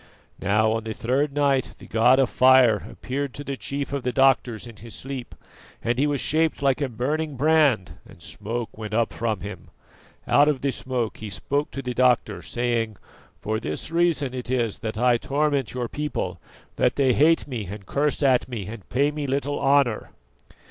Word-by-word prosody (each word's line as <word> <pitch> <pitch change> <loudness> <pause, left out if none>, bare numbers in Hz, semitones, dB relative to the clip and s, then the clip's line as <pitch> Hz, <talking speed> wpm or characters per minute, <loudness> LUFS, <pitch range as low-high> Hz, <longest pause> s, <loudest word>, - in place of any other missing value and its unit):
Now 110 +3 +2
on 110 0 -1
the 110 -1 -4
third 140 +4 0
night 140 -3 +1
the - - -13
God 120 +4 +4
of 135 - +4
Fire 130 -5 +5
appeared 135 0 -4
to 145 - -6
the 140 -1 -4
chief 140 +1 -4
of 140 - -1
the 125 - -1
doctors 130 -4 +2
in 115 -3 -11
his 115 0 -10
sleep, 135 -2 -6 0.5
and 120 +1 0
he 145 - +3
was 145 -1 0
shaped 155 +1 +1
like 135 0 +2
a 140 - 0
burning 145 +6 -2
brand 145 - +2
and - - -16
smoke 115 +3 -5
went 110 0 -5
up 115 0 +1
from 110 -2 -2
him. 105 +1 -8 0.6
Out 145 +1 +5
of 145 -4 +1
the 140 - +1
smoke 125 -4 -3
he 110 - -7
spoke 145 +8 -2
to 135 - -6
the 125 0 -3
doctor, 125 -1 +2
saying: 115 -3 -1 0.5
'For 110 +1 -1
this 75 - -5
reason 165 -6 +1
it 125 -1 -5
is 120 -4 0
that 110 -1 -4
I 120 +1 +4
torment 140 -1 0
your 125 -1 -2
people, 150 +4 -4 0.4
that - - +2
they 135 -3 +3
hate 160 +6 +4
me 115 -8 -4
and 100 +1 -8
curse 145 +6 0
at 130 -3 +3
me 115 -6 -4
and 105 0 -9
pay 140 +4 +2
me 150 -1 -4
little 140 +2 -1
honour. 135 -5 +2
130 Hz, 190 wpm, -24 LUFS, 115-140 Hz, 0.6 s, Fire